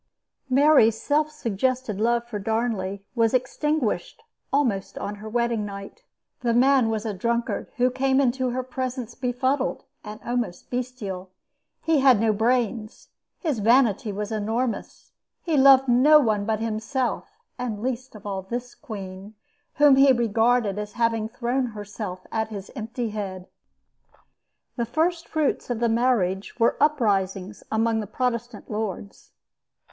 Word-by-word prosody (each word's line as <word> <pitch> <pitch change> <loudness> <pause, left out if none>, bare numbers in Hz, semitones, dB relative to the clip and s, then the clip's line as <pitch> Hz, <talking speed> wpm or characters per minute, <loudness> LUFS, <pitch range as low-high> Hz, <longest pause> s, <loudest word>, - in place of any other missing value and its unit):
Mary's 260 -5 +5
self 300 +3 +1
suggested 250 -4 -2
love 235 +1 +1
for 215 -3 -4
Darnley 200 -3 -2
was 230 0 +2
extinguished 295 - -1 0.3
almost 240 -9 0
on 205 - -4
her 215 - -7
wedding 235 -1 0
night. 200 - -8 0.4
The 235 -2 0
man 260 -1 +4
was 220 0 -2
a 215 - -2
drunkard 235 +3 -2
who 250 +1 +3
came 265 +1 +2
into 260 -1 +1
her 255 +1 -2
presence 255 -2 -4
befuddled 260 +2 -1 0.2
and 210 0 -8
almost 240 -7 -3
bestial. 235 -7 -4 0.5
He 320 -2 +3
had 260 -5 +6
no 220 0 +2
brains. 225 0 -1 0.3
His 300 - -1
vanity 230 0 +3
was 205 +2 -4
enormous. 225 +3 -3 0.3
He 330 -3 0
loved 270 -1 +7
no 270 +6 +6
one 215 -7 +1
but 220 -1 0
himself, 225 +4 -2 0.2
and 235 -4 -3
least 255 +1 -4
of 210 - -12
all 195 -2 -3
this 240 +6 -5
queen, 195 0 -9 0.4
whom 290 -2 +6
he 270 0 +7
regarded 230 -3 +2
as 210 0 -6
having 230 -2 0
thrown 245 +2 -1
herself 205 -4 -7
at 220 -1 -1
his 205 -3 -8
empty 230 0 -4
head. 195 -3 -5 1.3
The 235 - 0
first 335 +6 0
fruits 310 -5 -1
of 240 -2 -1
the 235 -1 +2
marriage 225 -4 0
were 230 - +3
uprisings 200 -9 +1
among 225 0 +1
the 210 - -4
Protestant 240 +2 -3
lords. 210 -2 -5
235 Hz, 140 wpm, -24 LUFS, 210-255 Hz, 1.3 s, loved